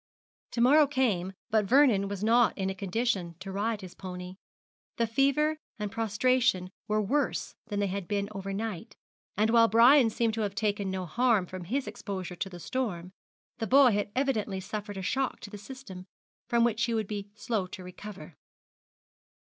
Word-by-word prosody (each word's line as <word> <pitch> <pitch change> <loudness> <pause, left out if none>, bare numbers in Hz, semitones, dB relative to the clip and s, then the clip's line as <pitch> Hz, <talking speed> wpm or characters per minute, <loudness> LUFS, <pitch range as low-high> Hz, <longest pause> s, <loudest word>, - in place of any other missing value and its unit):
To 235 - 0
morrow 290 +4 +6
came, 215 -10 0 0.2
but 215 -1 +3
Vernon 235 -5 +4
was 200 0 -5
not 235 +1 +4
in 190 -1 -1
a - - -3
condition 195 -2 -1
to 190 +1 -7
ride 210 +2 -1
his 185 -2 -9
pony. 180 0 -8 0.6
The 235 - +2
fever 280 +6 +2 0.2
and 210 -2 -4
prostration 225 -3 +1 0.2
were 215 0 +1
worse 275 +8 0
than 205 -1 -3
they 205 - +2
had 195 -2 -3
been 200 +1 -1
over 195 -1 -5
night, 205 -3 -5 0.4
and 215 +2 +3
while 230 -1 +6
Brian 235 +3 +6
seemed 225 0 0
to 225 - -2
have 200 -2 -2
taken 205 -1 -1
no 190 -1 -3
harm 225 +1 +2
from 185 0 -8
his 265 +8 -1
exposure 185 -4 -5
to 195 - -3
the 175 -2 -10
storm, 185 -6 -3 0.5
the 225 - -2
boy 265 0 +6
had 205 0 0
evidently 225 -8 0
suffered 205 +1 -6
a 190 - -5
shock 265 +7 -1
to 205 - -9
the 210 - -7
system, 200 -5 -10 0.4
from 235 -1 +3
which 235 -1 +1
he 235 -1 -1
would 220 -2 -1
be 205 -1 -5
slow 210 -3 -2
to 185 - -9
recover. 180 -3 -10
210 Hz, 180 wpm, -29 LUFS, 190-235 Hz, 0.6 s, morrow